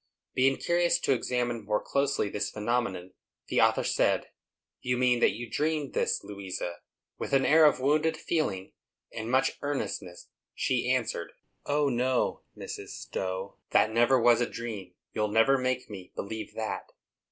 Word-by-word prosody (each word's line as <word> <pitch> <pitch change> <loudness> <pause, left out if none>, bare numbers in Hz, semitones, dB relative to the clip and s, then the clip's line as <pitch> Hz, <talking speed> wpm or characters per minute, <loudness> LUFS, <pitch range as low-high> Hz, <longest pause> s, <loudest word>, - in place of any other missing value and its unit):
Being 135 +1 +3
curious 175 0 +2
to - - +3
examine 120 -2 -1
more 105 0 +1
closely 140 -5 0
this 100 +1 -2
phenomenon, 105 -5 -2 0.4
the - - +3
author - - +4
said, - - +1 0.5
"You 125 0 0
mean 125 -1 +3
that - - +4
you 120 +2 -6
dreamed 150 +2 -1
this, - - 0
Louisa." 95 -3 -5 0.4
With - - -4
an 135 -1 +4
air 160 +1 +6
of 150 - +4
wounded 155 +4 +2
feeling, 130 - -2 0.4
and 110 0 -4
much 130 +2 +2
earnestness, 135 -11 -4 0.3
she 125 -1 0
answered, 115 -9 -1 0.3
"O 145 0 +2
no, 125 0 +1 0.2
Mrs. - - -7
Stowe; 95 +1 -5
that 110 - +4
never 120 +3 +4
was 120 0 +5
a 120 - 0
dream; 105 -6 -6 0.2
you'll 105 0 0
never 115 +6 +4
make 130 0 -1
me 95 -4 -9
believe 110 +2 -5
that." 110 -1 -4
120 Hz, 155 wpm, -29 LUFS, 105-135 Hz, 0.5 s, air